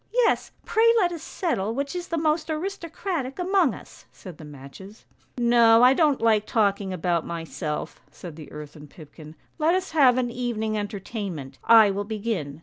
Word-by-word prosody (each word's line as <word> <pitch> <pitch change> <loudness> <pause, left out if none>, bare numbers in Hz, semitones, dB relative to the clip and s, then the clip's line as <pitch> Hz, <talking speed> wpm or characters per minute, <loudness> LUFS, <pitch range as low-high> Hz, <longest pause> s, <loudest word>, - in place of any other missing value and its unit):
" - - -41
' - - -39
Yes, - - 0 0.2
pray 460 +1 +4
let 360 -5 +2
us 335 -3 -6
settle 230 - -2
which 280 +5 -3
is 355 0 -5
the 335 - -3
most 315 0 0
aristocratic 335 -4 -4
among 360 - +1
us,' - - -15
said 180 -5 -12
the - - -10
matches. 150 - -12
" - - -36
' - - -42
No, 235 -1 +5
I 250 +1 +7
don't 295 -2 +2
like 220 -2 +2
talking 200 -3 0
about 175 -2 -1
myself,' 165 -2 -5
said 170 -4 -11
the 155 -2 -11
earthen 150 0 -10
pipkin; 155 0 -14 0.2
'let 320 +3 +3
us 375 0 -3
have 270 -6 +4
an 245 -2 -1
evening 230 -3 -3
entertainment! 200 - -6
I 220 -3 +7
will 200 +1 -3
begin. 205 -9 -4
225 Hz, 185 wpm, -24 LUFS, -, 0.2 s, I